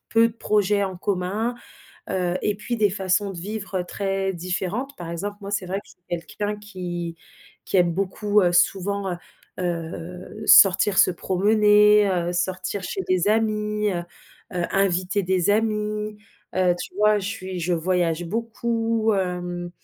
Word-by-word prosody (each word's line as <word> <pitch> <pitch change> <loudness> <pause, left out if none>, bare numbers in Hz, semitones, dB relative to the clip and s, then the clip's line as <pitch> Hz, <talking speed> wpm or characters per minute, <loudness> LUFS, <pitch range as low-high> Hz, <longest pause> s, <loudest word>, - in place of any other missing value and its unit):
peu 230 0 +5
de 225 - -11
projets 210 -2 +1
en 190 -2 -5
commun, 200 +5 -1 0.5
heu 180 -1 0
et 210 - 0
puis 225 +4 -4
des 210 -1 +4
façons 195 +1 0
de 180 - -9
vivre, 195 0 -4
heu, - - -3
très 195 +1 -2
différentes. 185 +9 -3
Par 170 -2 -7
exemple, 200 +5 -4
moi, 200 - -6
c'est 200 -2 -2
vrai 185 +2 -2
que - - -24
je - - -18
suis - - -21
quelqu'un 205 +5 -3
qui 175 -5 -5 0.5
qui - - 0
aime 175 -2 +4
beaucoup, 205 +3 +1
heu, 175 -2 +3
souvent, 195 +2 +1
heu - - -3 0.4
heu, 175 +3 -5
sortir 195 +1 +7
se - - +6
promener, 210 +3 +4
heu, 175 -1 0
sortir 185 +2 -2
chez 385 - -3
des 185 +1 +2
amis, 210 -1 +1
heu 175 - -2 0.5
heu, 175 -1 0
inviter 195 0 +1
des 185 0 +1
amis. 210 0 0 0.4
Heu, 180 -1 +3
tu - - -7
vois? 210 0 +4
Je 195 - -4
suis 190 -4 -5
je 175 +1 0
voyage 175 -1 0
beaucoup, 225 +2 -1
hem. 180 -2 -2
195 Hz, 165 wpm, -24 LUFS, 180-210 Hz, 0.5 s, sortir